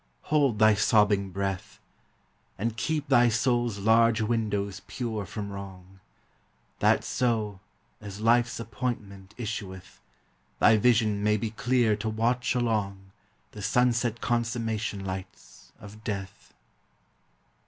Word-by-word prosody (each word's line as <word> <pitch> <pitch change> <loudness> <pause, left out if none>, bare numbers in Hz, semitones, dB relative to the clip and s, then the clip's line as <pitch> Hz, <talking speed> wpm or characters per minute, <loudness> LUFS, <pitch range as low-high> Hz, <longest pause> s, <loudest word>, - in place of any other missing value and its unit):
hold 140 -7 +3
thy 110 0 +6
sobbing 105 -2 +3
breath, 95 0 -4 0.8
And 115 +2 -2
keep 150 +5 -2
thy 120 0 +5
soul's 120 -1 +1
large 115 +2 +4
windows 105 -3 -1
pure 110 -6 -4
from 100 0 -6
wrong; 95 -1 -10 0.8
That - - +3
so, 110 -5 -1 0.4
as 100 -1 -8
life's 120 +2 +2
appointment 105 -4 -5
issueth, 100 -5 -6 0.6
Thy 110 0 +5
vision 110 -2 +2
may 105 +1 +2
be 110 +1 -3
clear 120 -1 +2
to 110 +1 -3
watch 120 +4 0
along 100 -5 -1 0.4
The 105 - -9
sunset 120 +2 +1
consummation 115 -4 -2
lights 95 0 -8
of 105 +1 -12
death. 100 -2 -6
110 Hz, 110 wpm, -27 LUFS, 100-115 Hz, 0.8 s, thy